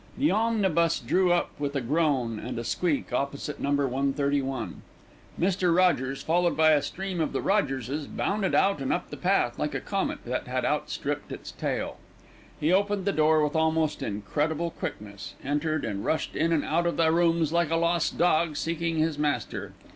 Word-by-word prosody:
The 290 +4 +3
omnibus 190 -7 +2
drew 185 -1 +2
up 175 - +1
with 145 0 -2
a - - +2
groan 130 -4 0
and 120 +2 -5
a 115 - -3
squeak 145 +2 -1
opposite 140 +3 -2
to - - -12
No. 140 - -1 0.2
131. 135 -1 -1 0.6
Mr. 180 -1 +2
Rogers, 135 -8 +2
followed 175 +1 +1
by 155 0 +6
a 150 -2 +4
stream 190 0 -4
of 155 - -2
little - - -1
Rogerses, 140 - 0
bounded 200 -1 -1
out 195 -7 +3
and 135 - -1
up - - -2
the - - -4
path - - +1
like - - -1
a - - 0
comet - - -3
that - - -3
had - - -1
outstripped - - -2
its - - -7
tail. - - -3 0.6
He 155 +4 +2
opened 200 0 +1
the 200 - +2
door 155 -2 +3
with 150 +1 -1
almost 160 -1 +1
incredible 150 +11 -1
quickness, 100 -7 -7
entered 150 +2 -1
and 100 -3 -3
rushed 160 - -1
in 165 +1 +1
and 160 -3 +1
out 170 +2 +1
of 170 - -1
the 160 -1 +4
rooms 165 -2 +2
like 170 -2 +2
a 165 - +1
lost 170 0 +1
dog 165 -3 +2
seeking 165 0 -1
his 155 -1 0
master. 150 -1 -2
160 Hz, 185 wpm, -27 LUFS, 140-170 Hz, 0.6 s, by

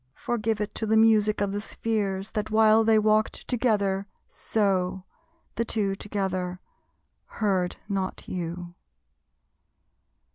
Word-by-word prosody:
Forgive 225 -2 -1
it 210 - -3
to 220 - -3
the 220 +1 +3
music 215 -2 +4
of 200 -1 0
the 205 +1 -3
spheres 205 -3 -2
That 215 -1 -2
while 220 0 +5
they 220 0 +4
walked 215 0 +1
together 205 -5 +1 0.2
so, 190 -3 -1 0.5
the 230 - +2
Two 205 -4 0
Together, 185 -3 -3 0.7
heard 190 -5 0
not 195 -2 -3
you. 175 0 -5
205 Hz, 115 wpm, -26 LUFS, 190-220 Hz, 0.7 s, while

